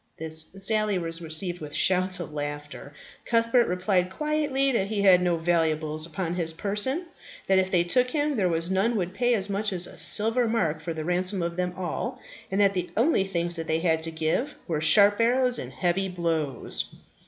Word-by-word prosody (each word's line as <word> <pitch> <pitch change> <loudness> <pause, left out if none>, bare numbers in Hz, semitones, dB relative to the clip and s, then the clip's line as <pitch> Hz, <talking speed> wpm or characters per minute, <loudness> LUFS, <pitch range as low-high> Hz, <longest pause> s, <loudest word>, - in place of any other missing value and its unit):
This 160 0 +3
sally 210 0 +3
was 165 -1 -4
received 170 +2 -3
with 150 -1 -7
shouts 185 +1 +1
of 165 -3 -7
laughter. 145 -1 -6 0.3
Cuthbert 230 +1 +2
replied 180 0 0
quietly 290 +2 0
that 195 -6 0
he 205 -1 -2
had 185 -2 +6
no 175 -1 +1
valuables 160 -2 0
upon 170 +1 -4
his 165 -2 -3
person; 210 - -2 0.4
that 190 -1 +3
if 190 0 0
they 175 -2 +2
took 250 +9 +1
him 295 0 -1
there 190 -6 +1
were 165 -1 0
none 200 +5 +1
would 180 -3 -2
pay 245 +3 +1
as 200 -2 -2
much 205 +1 -2
as 180 -2 0
a - - -12
silver 225 +3 +2
mark 165 -9 -1
for 165 - -5
the 155 -1 -5
ransom 180 +2 -1
of 170 0 -3
them 180 0 -3
all; 190 +8 -4 0.3
and 195 - -2
that 200 -1 +4
the 180 -2 -3
only 230 -5 +2
things 175 -2 -2
that 165 - -5
they 160 - +1
had 160 -2 +1
to 165 - +2
give 160 - -2
were 160 -4 -2
sharp 205 +6 +5
arrows 250 +1 +5
and - - -6
heavy 190 +2 -1
blows. 165 -7 -2
185 Hz, 200 wpm, -25 LUFS, 165-215 Hz, 0.4 s, had